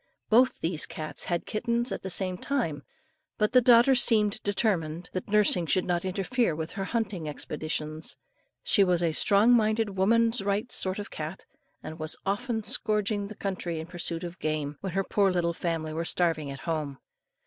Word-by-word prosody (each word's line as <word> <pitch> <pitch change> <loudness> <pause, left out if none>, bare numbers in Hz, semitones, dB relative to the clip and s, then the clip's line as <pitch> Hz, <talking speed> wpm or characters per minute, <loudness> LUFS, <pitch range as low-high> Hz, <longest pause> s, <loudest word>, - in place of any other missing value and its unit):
Both 250 +4 +4
these 160 -1 0
cats 155 -1 -5
had 175 -1 -2
kittens 235 +2 -1
at - - -4
the 190 - -5
same 185 0 0
time, 180 - -2 0.6
but 210 0 +1
the 250 - +6
daughter 240 +2 +6
seemed 220 -4 +3
determined, 180 -5 -1
that 185 - -4
nursing 200 -5 +3
should 185 +3 +2
not 175 -1 0
interfere 195 +1 0
with 160 +1 -5
her 195 -2 -4
hunting 195 -8 -2
expeditions. 155 +1 -5 0.5
She 200 - +4
was 180 -2 +2
a 165 - +2
strong 205 +8 +4
minded 220 -3 +2
woman's 230 +4 +3
rights 200 +4 -1
sort 185 0 +2
of 205 - -4
a - - -13
cat, 155 +4 -6 0.4
and 155 +2 -8
was 155 +1 -2
often 220 +3 -1
scouring 210 -2 0
the 215 - -9
country 180 -5 -4
in 160 - -5
pursuit 170 -1 -5
of 175 +1 -7
game, 155 -2 -2
when 190 -3 -4
her 195 +1 +1
poor 200 0 +2
little 175 -2 0
family 165 -2 -3
were 165 +1 -2
starving 165 -4 0
at 135 -1 -7
home. 150 -4 -3
190 Hz, 180 wpm, -27 LUFS, 165-215 Hz, 0.6 s, the